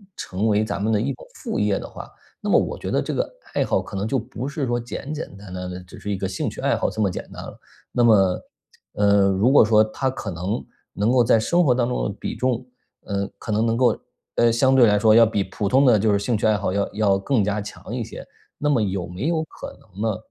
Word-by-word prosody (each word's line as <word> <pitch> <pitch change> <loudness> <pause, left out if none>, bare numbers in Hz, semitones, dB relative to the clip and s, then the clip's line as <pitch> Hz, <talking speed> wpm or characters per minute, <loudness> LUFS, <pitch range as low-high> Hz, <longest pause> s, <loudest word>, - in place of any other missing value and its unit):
成 95 +4 -2
为 105 0 +3
咱 110 - -3
们 110 +2 +1
的 105 - +2
一 135 +4 -1
种 125 - -13
副 - - -4
业 105 -1 +2
的 - - -6
话， - - -9 0.3
那 - - -3
么 - - +5
我 - - -3
觉 - - -5
得 - - +1
这 - - -3
个 - - -1 0.2
爱 - - +1
好 - - +1
可 - - -7
能 100 +2 -1
就 135 - 0
不 120 +3 -6
是 140 0 -2
说 120 -1 0
简 130 +5 -6
简 155 - -4
单 100 -2 -11
单 90 0 -5
的 90 0 -6
只 90 - -13
是 105 - -6
一 100 - -1
个 95 - -3
兴 95 - -2
趣 - - -8
爱 - - +2
好 - - 0
这 110 - -4
么 100 -3 +2
简 - - -7
单 - - -8
了。 - - -10 0.3
那 120 - +2
么， 95 -6 +4 0.5
呃， 100 -1 +4
如 100 +7 +3
果 140 - +7
说 105 0 +5
它 130 +5 -2
可 115 -5 -6
能 90 +7 -3 0.3
能 105 +4 +1
够 125 -1 +5
在 115 - +4
生 175 +10 +2
活 130 - +5
当 120 -1 +1
中 125 - -1
的 100 - -3
比 - - -4
重， 130 -1 0 0.4
呃， 100 -1 -1
可 - - -5
能 110 +2 +2
能 115 0 +1
够， 120 -2 +3 0.4
呃， 120 0 +4
相 130 +3 +3
对 130 -2 +7
来 105 -1 +3
说 110 +1 +5
要 115 0 +8
比 105 -3 0
普 100 +2 -3
通 130 +7 +4
的 120 -3 +6
就 105 +1 +2
是 100 - +2
兴 110 +3 0
趣 105 - -2
爱 110 - +4
好 95 - -2
要 100 +1 0
要 100 -2 +2
更 115 +2 +1
加 105 +1 -1
强 105 +2 -9
一 125 - -2
些。 - - -9 0.4
那 150 - 0
么 140 -5 +3
有 95 -4 -2
没 90 +8 -5
有 165 -1 +1
可 - - -10
能 100 -1 -12
呢， 100 - -4
110 Hz, 295 characters per minute, -23 LUFS, 100-120 Hz, 0.5 s, 要